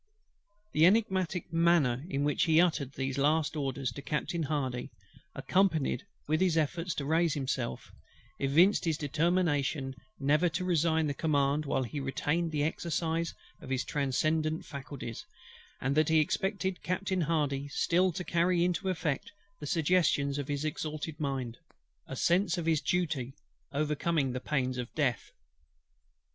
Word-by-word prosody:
" 205 +1 -43
The 155 +2 +6
energetic 190 -5 +1
manner 165 -7 +3
in 140 -5 -1
which 145 -1 +2
he 160 -1 +4
uttered 155 -6 +2
these 135 0 -3
his - - +1
last 155 +2 +2
orders 135 -3 -2
to 140 - -8
Captain 160 +4 -2
HARDY, 135 -5 -2 0.5
accompanied 185 -2 +1 0.2
with 155 +3 +1
his 180 -3 +3
efforts 165 +3 -1
to 140 - -3
raise 160 +1 +2
himself, 130 - -3 0.5
evinced 165 +10 +4
his 160 -3 +1
determination 150 -3 0 0.3
never 150 +5 +3
to 175 +3 -3
resign 160 -2 +2
the 145 - -1
command 145 0 +1
while 135 -1 +1
he 135 +4 -5
retained 150 +5 -1
the 150 -2 0
exercise 165 +1 -1 0.3
of - - -10
his 130 -1 0
transcendant 155 +3 0
faculties, 135 -4 -7 0.6
and 135 +2 0
that 155 0 +3
he 160 - +4
expected 190 +3 -1
Captain 185 0 -1
HARDY 145 -3 0
still 180 +6 +2
to 180 - -4
carry 175 0 +2
into 180 +2 -1
effect 160 -6 -2 0.3
the 150 - -6
suggestions 155 -4 +2
of 140 - -4
his 145 +1 -2
exalted 155 0 -4
mind; 135 -5 -3 0.5
a 135 - -6
sense 175 +5 +2
of 170 - -3
his 160 -2 +2
duty 150 -7 -1 0.4
overcoming 150 0 0
the 130 - -3
pains 130 -2 -1
of 125 0 -5
death. 130 -8 0
155 Hz, 150 wpm, -30 LUFS, 140-170 Hz, 0.6 s, The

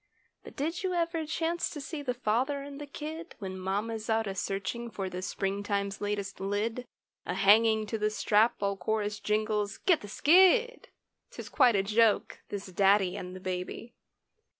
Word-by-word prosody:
But - - -12
did 325 +5 -2
you 370 -1 -1
ever 335 -2 -1
chance 330 +2 -1
to 300 - -7
see 295 +2 -6
the 250 -3 -2
father 255 +5 0
and 285 0 -9
the 290 - -7
"kid," 315 +4 -7
When 190 -2 -6
mamma's 215 +4 -3
out 225 0 +2
a 195 - -3
searching 200 +5 -3
for 195 -4 -5
the 180 - -5
spring 195 +2 -2
time's 200 -1 -2
latest 205 -1 -3
"lid," 215 +5 -2 0.4
A - - -2
hanging 220 +2 +5
to 220 +1 -4
the 210 0 +1
strap, 215 +1 +3
while 200 0 -1
chorus 210 +2 -2
jingles 210 -1 -1
"Get 355 -4 +2
the 205 - -8
skid!" 380 - +4 0.4
'Tis - - -9
quite 250 -6 +4
a 195 - +2
joke, 215 +1 +2
this 200 -1 -5
daddy 195 0 +3
and 180 0 -6
the - - -7
baby. 185 +5 -5
215 Hz, 175 wpm, -29 LUFS, 200-280 Hz, 0.4 s, hanging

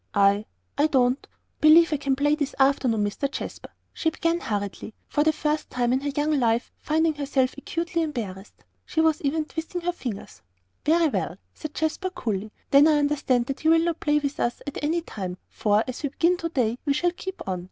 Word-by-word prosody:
"I 200 +1 +4 0.3
I 295 - +5
don't 255 -2 +2 0.3
believe 320 +1 +7
I - - +2
can 275 -1 0
play 290 +2 +2
this 295 -2 -2
morning, 265 -5 +3
Mr. 205 +7 -2
Jasper," - - -6 0.2
she 325 - 0
began 335 +2 0
hurriedly, 205 - -4
for 295 - +1
the 315 - +4
first 305 0 -2
time 245 -1 0
in 260 - +1
her 285 - -2
young 295 +1 +1
life 235 0 +1
finding 320 +1 +1
herself 275 -3 0
actually 335 +4 -2
embarrassed. 215 - -5 0.2
She 320 - -3
was 320 -1 +3
even 305 +2 0
twisting 325 +3 -5
her 355 +1 0
fingers. 240 - -7 0.5
"Very 330 +1 +4
well," - - -2 0.2
said 310 -1 -8
Jasper, 315 +4 -1
coolly, 215 - -3 0.2
"then 280 +2 +7
I 310 -1 +4
understand 285 -4 +1
that 275 +3 -5
you 315 - +4
will 325 0 +5
not 340 -1 -1
play 295 -1 +2
with 285 -1 -2
us 240 - -1
at 285 - -6
any 330 +3 +1
time, 185 - -6
for, 210 0 +2
as 255 - -5
we 285 - -1
begin 335 +6 +2
to 335 -1 -3
day, 245 -6 0
we 285 - +1
shall 345 +5 +1
keep 380 - -7
on. 185 -1 -1
290 Hz, 205 wpm, -25 LUFS, 245-320 Hz, 0.5 s, believe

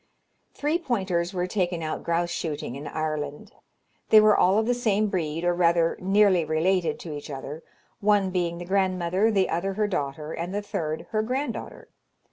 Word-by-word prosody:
Three 300 +4 0
pointers 190 - -1
were 180 -2 -1
taken 180 -3 -1
out 155 - -3
grouse 170 +1 0
shooting 150 -7 -4
in 145 +2 -7
Ireland. 155 +4 -4 0.6
They 220 - +9
were 215 0 +6
all 190 +3 +4
of 220 - +2
the 245 - +2
same 215 -3 +1
breed, 165 -3 -2
or 175 0 +2
rather 170 -1 +3
nearly 195 -2 +4
related 165 +3 +1
to 160 - -6
each 145 - -8
other, 145 +2 -6 0.4
one 200 -2 +2
being 175 -2 -1
the 175 - -7
grandmother, 185 +1 +1
the 195 -4 +2
other 190 +4 -1
her 210 +1 +1
daughter, 150 -4 -3
and 175 +3 -4
the 205 - -2
third 160 -4 -3
her 215 -1 +1
granddaughter. 255 +3 -4
180 Hz, 175 wpm, -26 LUFS, 165-205 Hz, 0.6 s, They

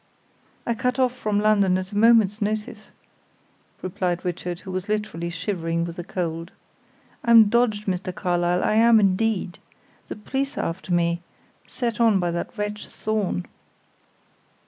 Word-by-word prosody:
"I 235 - +1
cut 250 +2 -1
off 255 -1 +2
from 210 -4 -1
London 200 -3 +3
at 185 0 -5
a - - -7
moment's 215 -1 +4
notice," 215 +1 -3 0.9
replied 180 -1 -2
Richard, 175 0 -4
who 190 - -8
was 185 +2 -4
literally 210 -6 -2
shivering 170 -1 -2
with 170 -1 -6
the 175 - -4
cold. 165 -1 -4 0.7
"I'm 230 -3 +7
dodged, 220 -2 +1
Mr. 185 -1 -2
Carlyle, 175 -1 0
I - - +2
am 225 +1 +6
indeed. 195 -1 0 0.5
The - - -6
police 270 +6 -3
are - - -1
after 180 +2 -5
me, 170 0 +1 0.5
set 235 -3 -3
on 220 -4 +4
by 175 -1 0
that 170 +7 -5
wretch 210 0 -4
Thorn." 210 - -2
200 Hz, 145 wpm, -24 LUFS, 175-220 Hz, 0.9 s, I'm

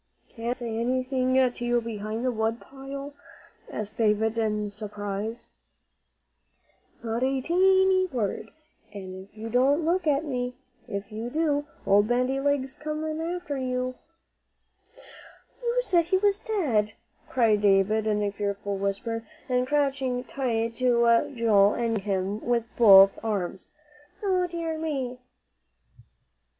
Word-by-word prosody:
"Can't 230 0 -5
I - - +2
say 235 -3 -4
anything 255 +1 0
to 255 -2 +2
you 240 0 +2
behind 220 0 -4
the 255 - +2
wood 225 0 -1
pile?" 275 +1 -8 0.6
asked 210 -1 -5
David, 220 0 +2
in 210 -2 -1
surprise. 205 +2 -5 1.5
"No, 230 - -4
not 235 - -1
a 265 +1 +1
teenty 375 +3 +3
word. 220 -2 -2 0.5
An' 190 0 -8 0.2
don't 265 +5 +3
you 325 - -3
look 345 0 +1
at 295 +1 +2
me. 250 -3 -3 0.3
If 200 -1 -5
you 225 +3 -5
do, 295 0 0 0.2
Old 205 +1 +4
Bandy 250 +3 +1
Legs'll 280 0 -1
come 310 +1 -3
after 340 -3 -3
you." 255 0 -2 1.7
"You 480 0 0
said 345 -7 +2
he 375 +3 +2
was 405 +1 +2
dead," 250 - 0 0.4
cried 225 -5 +3
David 205 +2 +3
in 210 -1 +1
a 205 - 0
fearful 200 0 -3
whisper, 200 +4 -2 0.2
and 250 -1 +1
crouching 270 -3 0
tight 230 -4 -2
to 235 -2 +3
Joel 210 -4 +4
and 230 -1 0
gripping 205 -2 -2
him 195 +3 -1
with 240 -1 +1
both 195 -4 +8
arms. 190 -4 -3 0.6
"O 370 -2 +1
dear 335 -2 -4
me!" 265 -6 -3
245 Hz, 135 wpm, -26 LUFS, 215-285 Hz, 1.7 s, both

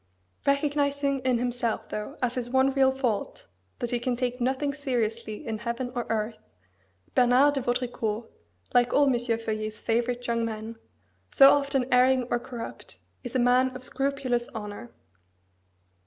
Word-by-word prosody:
Recognising 280 -1 +1
in 255 -1 +1
himself, 245 -1 -2
though 215 +8 -5
as 245 -1 +1
his 245 -1 -3
one 265 +1 +3
real 265 -1 +4
fault, 265 - -2 0.3
that 240 -2 -3
he 245 - 0
can 245 +1 -1
take 250 0 -2
nothing 265 +3 0
seriously 235 -4 -3
in 220 -2 -3
heaven 235 +2 -3
or 240 -2 -3
earth, 220 0 -2 0.7
Bernard 255 +4 +5
de 275 - -1
Vaudricourt, 240 -3 -2 0.5
like 245 0 +3
all 285 - +5
M. 270 - +3
Feuillet's 225 -3 -2
favourite 240 +2 -1
young 230 -1 0
men, 225 0 -5 0.5
so 275 -1 +8
often 280 -2 +1
erring 255 +1 +5
or 240 - +2
corrupt, 235 -1 -8 0.3
is 245 0 -7
a - - +4
man 250 +1 +3
of 255 - -8
scrupulous 270 -3 -1
"honour." 210 +2 -7
245 Hz, 150 wpm, -27 LUFS, 235-265 Hz, 0.7 s, so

